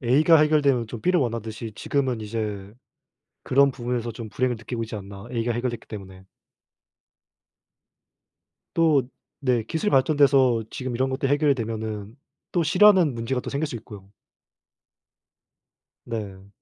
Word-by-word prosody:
...에이가 150 +6 +5
해결되면 145 -6 +3
좀 115 0 -7
비를 180 +5 +2
원하듯이 115 -2 -4
지금은 130 -4 -1
이제 105 -2 -4 0.7
그런 140 +1 +4
부분에서 120 -2 -3
좀 110 0 -8
불행을 125 +1 -1
느끼고 115 +1 -5
있지 115 - -8
않나, 100 0 -8
에이가 120 -1 -1
해결됐기 120 0 -3
때문에. 95 -3 -9 2.5
또 155 -6 +3 0.4
네 125 -4 +1
기술이 165 - -1
발전돼서 135 -4 +4
지금 130 -3 -4
이런 130 +2 0
것들이 135 +1 -1
해결이 145 -1 +3
되면은 110 -2 -5 0.4
또 175 - +1
싫어하는 185 -2 +5
문제가 115 +2 -2
또 - - -6
생길 145 +2 -1
수 125 - -6
있고요. 105 -4 -11 1.9
네. 100 -4 -6
120 Hz, 305 characters per minute, -24 LUFS, 110-140 Hz, 2.5 s, 에이가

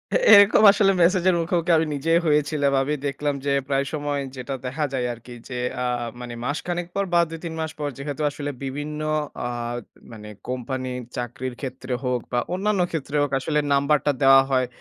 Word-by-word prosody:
এ - - +7 0.2
এরকম 205 +1 +7
আসলে 200 -1 +3
মেসেজের 180 +1 +4
মুখোমুখি 170 +1 0
আমি 160 - +2
নিজেই 165 +4 +2
হয়েছিলাম। 150 -1 +2
আমি 145 +3 -1
দেখলাম 145 +1 -2
যে 140 - +2
প্রায় 140 0 +1
সময় 145 -1 -2
যেটা 130 +2 -5
দেখা 150 +4 -1
যায় 125 -2 -1
আরকি 120 +1 -12 0.2
যে 125 -1 -4 0.2
আ - - 0 0.3
মানে 120 -1 -7
মাসখানেক 175 +4 -3
পর 200 - +1
বা 170 - +5
২ 165 0 -7
৩ 165 - -4
মাস 160 -1 -2
পর 145 -1 -1
যেহেতু 145 +2 -5
আসলে 145 0 -5
বিভিন্ন 145 +3 -4 0.5
আ - - -1 0.6
মানে 105 -1 -10 0.2
কোম্পানির 130 0 -4 0.2
চাকরির 125 +1 -4
ক্ষেত্রে 130 -1 -5
হোক 125 -1 0
বা 120 - +1
অন্যান্য 200 0 +1
ক্ষেত্রে 150 -2 -4
হোক 145 - 0
আসলে 150 +2 0
নাম্বারটা 145 +1 +2
দেওয়া 135 0 +8
হয়। 130 -1 +2
145 Hz, 180 wpm, -23 LUFS, 130-160 Hz, 0.6 s, দেওয়া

